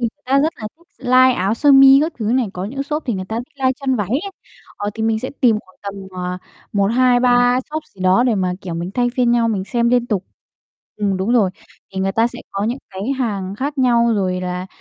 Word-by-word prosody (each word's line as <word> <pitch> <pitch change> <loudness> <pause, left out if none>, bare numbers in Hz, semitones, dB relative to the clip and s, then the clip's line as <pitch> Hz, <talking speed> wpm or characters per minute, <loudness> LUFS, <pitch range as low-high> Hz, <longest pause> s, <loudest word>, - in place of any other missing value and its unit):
người 230 -1 -3
ta 270 +2 +2
rất 315 +3 +1
là 215 - -6
thích 340 - -26 0.2
live 255 +1 +6
áo 195 -2 0
sơ 285 +4 +4
mi 270 0 +8
các 325 - -1
thứ 220 - -3
này. 255 -2 +2
Có 180 - -5
những 270 +7 -4
shop 300 +2 -3
thì 240 - 0
người 185 -1 -4
ta 220 +4 -5
thích 245 +6 -9
live 260 -1 +2
chân 265 -2 0
váy 205 -5 -2
ấy. 290 - -2 0.5
Ờ, 205 - -3
thì 220 - -4
mình 220 0 +1
sẽ 260 - -5
tìm 235 -5 +4
khoảng 185 -2 -24
tầm, 200 -1 -5 0.2
ờ, 180 0 -4 0.3
1-2-3 245 +3 +3
shop 310 +1 -3
gì 190 - -20
đó 185 +5 +4
để 245 -3 +2
mà, 185 -2 0
kiểu, 175 -3 -6
mình 170 +2 -4
thay 245 -1 +2
phiên 245 -2 +3
nhau 235 -1 +2
mình 200 -4 -1
xem 235 +2 0
liên 245 0 +2
tục. 200 -5 -2 0.7
Ừm, 200 -2 0
đúng 190 +5 -1
rồi, 215 -6 +3 0.4
thì 190 - -2
người 195 0 0
ta 225 +3 +2
sẽ - - -7
có 200 +1 -2
những 240 +5 -2
cái 190 0 -7 0.2
hàng 200 -6 -2
khác 280 +6 -4
nhau 235 -2 +3
rồi 185 -3 -1
là, 180 0 -4
235 Hz, 245 wpm, -19 LUFS, 195-255 Hz, 0.7 s, mi